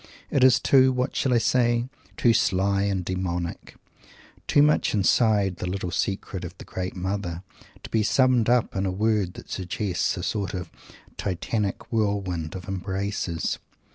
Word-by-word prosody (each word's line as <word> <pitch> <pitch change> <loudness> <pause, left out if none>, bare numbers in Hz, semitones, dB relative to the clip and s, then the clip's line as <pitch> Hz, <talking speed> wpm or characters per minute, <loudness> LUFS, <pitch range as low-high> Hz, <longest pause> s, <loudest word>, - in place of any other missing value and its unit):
It 135 - +3
is 130 -2 +6
too 130 -1 +5
what 125 +1 -1
shall 135 - +1
I 120 - +4
say? 120 +1 +2 0.3
too 120 - +4
sly 100 -2 +2
and 95 -3 -1
demonic 90 -2 -3 0.7
too 145 - +5
much 150 -6 +2
inside 100 -2 +3
the 90 - -3
little 90 -1 -3
secrets 95 0 -2
of 90 +1 -8
the - - -10
great 90 0 -5
Mother 95 -2 -3 0.4
to - - -8
be 110 - +2
summed 125 +1 +3
up 120 -1 +2
in 95 0 0
a - - 0
word 105 -2 0
that - - -11
suggests 95 0 -1
a - - -4
sort 100 -2 -2
of 90 - -6 0.5
Titanic 100 +4 -2
whirlwind 95 -7 -1
of 90 -2 -7
embraces. 95 -2 -2
100 Hz, 160 wpm, -25 LUFS, 90-115 Hz, 0.7 s, is